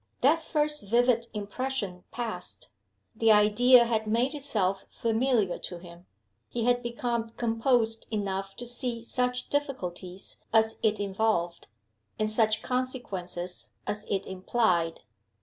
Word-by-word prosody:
That 310 +6 +4
first 300 -1 0
vivid 235 0 +3
impression 205 -3 -3
past, 235 -2 -5 0.5
the 225 0 +4
idea 235 +4 +6
had 220 -2 0
made 240 +6 +2
itself 210 -10 -1
familiar 230 -4 +1
to 175 - -6
him. 175 0 -13 0.4
He 235 - -2
had 245 +1 +3
become 235 -1 -2
composed 225 0 +1
enough 195 -2 -2
to 245 - -7
see 240 -1 -2
such 250 +1 -1
difficulties 190 -10 -4
as 220 0 +3
it 215 -1 +2
involved, 195 -4 0 0.5
and 215 - +1
such 215 0 +2
consequences 195 -9 -4
as 210 0 -3
it 195 -1 0
implied. 185 -3 0
225 Hz, 120 wpm, -28 LUFS, 195-245 Hz, 0.5 s, idea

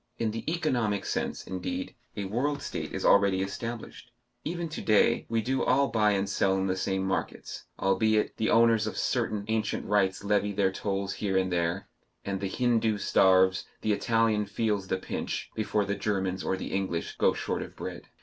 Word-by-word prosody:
In 115 -2 0
the 115 +1 -5
economic 120 - 0
sense, - - -2
indeed, 90 -1 -4 0.2
a 100 - -2
world 140 +8 -1
state - - -4
is - - -3
already 100 -1 +4
established. 115 +4 -6 0.3
Even 170 +1 -3
to 155 - -5
day 110 +2 +3
we 115 -1 0
do 130 +3 0
all 140 +2 +3
buy 105 -2 +3
and 100 0 0
sell 95 0 +1
in 95 - 0
the 95 -1 0
same 95 0 -1
markets 95 - -3
albeit 110 +2 +1
the 110 - +1
owners 115 -1 +4
of - - -4
certain 110 -5 -1
ancient 110 -1 -1
rights 100 -2 +1
levy 105 0 +1
their 95 -1 +2
tolls 100 0 -2
here 95 -3 -1
and 95 -1 +1
there 90 +3 -1 0.4
and 100 -1 -3
the 100 - -2
Hindoo 115 -2 +1
starves, 95 -2 +4 0.2
the 110 - +1
Italian 110 -1 +1
feels 105 -2 -1
the 95 - 0
pinch, - - -4
before 105 -1 0
the 100 - -1
Germans 95 -3 -1
or 95 - 0
the - - -5
English 95 -4 -2
go - - +4
short - - -3
of - - -8
bread. - - -7
105 Hz, 185 wpm, -28 LUFS, 95-115 Hz, 0.4 s, already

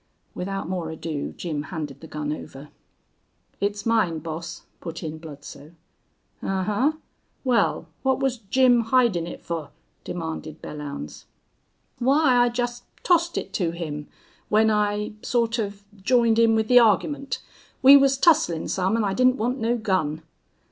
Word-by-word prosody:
Without 195 0 -4
more 175 -3 -3
ado 160 -2 -4
Jim 155 -4 -3
handed 150 -3 -6
the 160 - -10
gun 150 -1 -3
over. 145 -1 -9 0.9
"It's 205 +2 -2
mine, 215 -8 +2
boss," 160 +1 -6 0.2
put 165 0 -7
in 160 0 -5
Bludsoe. 145 -1 -11 0.7
"Ahuh? 210 +11 0 0.5
Wal, 250 -3 +1
what 265 -1 +1
was 265 -3 0
Jim 240 +2 +3
hidin' 225 -9 +2
it - - -8
fer?" 165 -4 -4 0.3
demanded 160 -2 -5
Belllounds. 140 - -7 0.7
"Why, 265 +1 +4
I 245 0 +5
jest 240 0 -3 0.2
tossed 340 -1 +2
it 190 - -4
to 180 -5 0
him 150 -3 -5 0.4
when 220 +1 +4
I 210 0 0
sort 235 -1 0
of 200 -1 -4 0.2
j'ined 235 0 +3
in 225 -1 +5
with 220 -1 +1
the 245 +1 +7
argyment. 270 +5 +2 0.5
We 270 +2 +10
was 275 -1 +5
tusslin' 290 - +3
some 190 +4 +1
an' 225 - +1
I 195 -2 0
didn't 255 +3 +3
want 245 +4 -1
no 235 +2 +1
gun." 175 -8 -1
205 Hz, 145 wpm, -24 LUFS, 160-245 Hz, 0.9 s, We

